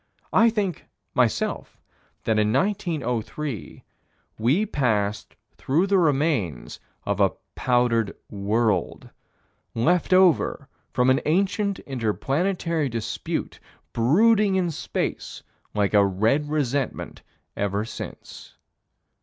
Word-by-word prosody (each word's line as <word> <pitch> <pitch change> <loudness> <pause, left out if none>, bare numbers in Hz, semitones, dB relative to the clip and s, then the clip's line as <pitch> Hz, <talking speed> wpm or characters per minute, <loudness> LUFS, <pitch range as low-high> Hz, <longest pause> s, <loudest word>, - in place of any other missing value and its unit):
I 230 +1 +6
think, 205 -6 -2 0.3
myself, - - 0 0.4
that 110 -1 +1
in 105 0 +2
1903, 145 - -2 0.6
we 140 - +2
passed 110 - -1 0.2
through 155 +8 +1
the 195 -1 +3
remains 140 - 0 0.3
of - - -1
a - - +3 0.2
powdered 120 -4 +1
world 105 -1 -1 0.6
left 170 +12 +1
over 185 -6 +3 0.2
from 125 0 +3
an 130 - +2
ancient 195 +4 +1
inter 120 -6 -2
planetary 165 - -1
dispute, 115 -1 -4 0.3
brooding 200 - +4
in 180 -3 +1
space - - -4 0.3
like 105 -1 +1
a 100 -1 +6
red 110 +10 +1
resentment 140 -3 -2 0.3
ever 100 +1 -1
since. - - -9
135 Hz, 100 wpm, -24 LUFS, 110-180 Hz, 0.6 s, I